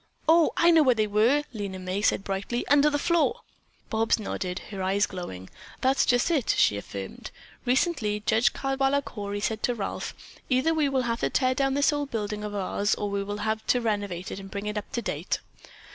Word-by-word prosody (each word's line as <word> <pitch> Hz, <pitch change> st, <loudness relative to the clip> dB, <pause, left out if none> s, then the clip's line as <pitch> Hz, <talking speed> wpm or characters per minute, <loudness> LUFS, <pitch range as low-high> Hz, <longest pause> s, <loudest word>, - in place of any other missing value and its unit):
"Oh, 325 Hz, 0 st, +5 dB
I 340 Hz, 0 st, +6 dB
know 325 Hz, -1 st, +6 dB
where 255 Hz, -4 st, +4 dB
they 215 Hz, -1 st, +2 dB
were," 220 Hz, +8 st, +3 dB
Lena 200 Hz, -4 st, -4 dB
May 185 Hz, +2 st, -3 dB
said 195 Hz, -, +2 dB
brightly, 195 Hz, +5 st, -3 dB
"under 290 Hz, +1 st, +5 dB
the 290 Hz, -, 0 dB
floor." 340 Hz, +3 st, +1 dB, 0.5 s
Bobs 225 Hz, 0 st, +2 dB
nodded, 185 Hz, -4 st, -4 dB
her 195 Hz, -2 st, -5 dB
eyes 195 Hz, +2 st, +2 dB
glowing. 95 Hz, -, -7 dB, 0.3 s
"That's 265 Hz, +1 st, +3 dB
just 245 Hz, +6 st, +3 dB
it!" 285 Hz, -9 st, +2 dB
she -, -, +4 dB
affirmed. 100 Hz, -1 st, -7 dB, 0.4 s
"Recently 245 Hz, -, +1 dB
Judge 225 Hz, +2 st, +3 dB
Caldwaller 270 Hz, +1 st, 0 dB
Cory 205 Hz, -2 st, -5 dB
said 220 Hz, +1 st, -1 dB
to 245 Hz, -, 0 dB
Ralph, 200 Hz, -4 st, -4 dB, 0.3 s
'Either 260 Hz, +5 st, +3 dB
we 305 Hz, -3 st, +2 dB
will 265 Hz, -2 st, +1 dB
have 235 Hz, -1 st, -1 dB
to -, -, 0 dB
tear 255 Hz, -1 st, +2 dB
down 270 Hz, +1 st, +1 dB
this 285 Hz, +1 st, +3 dB
old 290 Hz, -1 st, -2 dB
building 210 Hz, -2 st, -3 dB
of 210 Hz, -1 st, -5 dB
ours 200 Hz, +1 st, 0 dB
or 205 Hz, -1 st, -3 dB
we 200 Hz, 0 st, -1 dB
will 205 Hz, +1 st, -4 dB
have 220 Hz, 0 st, -1 dB
to 250 Hz, -, +3 dB
renovate 205 Hz, -6 st, -2 dB
it -, -, -5 dB
and 195 Hz, 0 st, -9 dB
bring 200 Hz, +1 st, -5 dB
it 210 Hz, 0 st, -3 dB
up 210 Hz, -, -5 dB
to 235 Hz, -, -2 dB
date.' -, -, -2 dB
220 Hz, 205 wpm, -27 LUFS, 200-270 Hz, 0.5 s, I